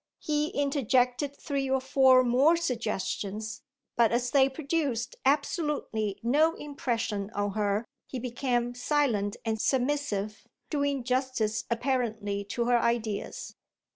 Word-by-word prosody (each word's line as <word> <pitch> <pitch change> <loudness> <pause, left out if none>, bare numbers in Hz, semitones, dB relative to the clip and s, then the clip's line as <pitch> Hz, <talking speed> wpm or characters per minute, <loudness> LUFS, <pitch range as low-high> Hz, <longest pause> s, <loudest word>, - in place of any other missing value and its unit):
He 300 -2 0
interjected 275 -1 +1
three 275 -2 -2
or 265 0 +2
four 260 -1 +5
more 265 +7 +4
suggestions, 220 - -3 0.3
but 235 -2 +4
as 245 +1 0
they 270 -1 +5
produced 275 -4 -2
absolutely 280 - 0
no 305 +7 +3
impression 230 -8 -3
on 205 0 0
her 205 +1 0 0.2
he 260 - -5
became 245 0 -1
silent 245 -6 0
and 220 -1 -1
submissive, 245 -6 -1 0.2
doing 285 -3 0
justice 250 -4 0
apparently 230 -5 -1
to 235 +4 -2
her 240 0 +4
ideas. 230 -3 -2
245 Hz, 115 wpm, -28 LUFS, 220-280 Hz, 0.3 s, four